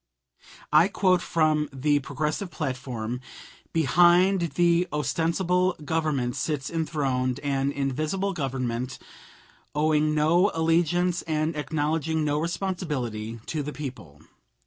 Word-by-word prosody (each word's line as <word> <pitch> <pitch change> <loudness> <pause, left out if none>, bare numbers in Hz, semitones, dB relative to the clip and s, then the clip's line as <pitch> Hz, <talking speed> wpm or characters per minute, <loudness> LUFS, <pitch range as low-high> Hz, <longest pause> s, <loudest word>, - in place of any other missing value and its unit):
I 155 +4 +7
quote 185 -2 +2
from 155 -2 +1
the 145 +2 +1
Progressive 150 +7 -3
platform: 130 -6 -4 0.5
"Behind 175 +3 +4
the 175 0 +3
ostensible 175 +4 +1
Government 145 -6 0
sits 145 -4 -2
enthroned 135 -6 -1
an 140 -1 0
invisible 155 +8 -1
Government, 130 -4 -3 0.8
owing 155 0 +2
no 170 +6 +4
allegiance 170 +2 +2
and 155 0 0
acknowledging 155 +1 -1
no 145 0 +1
responsibility 145 - -3
to 155 - -2
the 145 +1 -5
people. 125 - -8
155 Hz, 100 wpm, -26 LUFS, 135-170 Hz, 0.8 s, I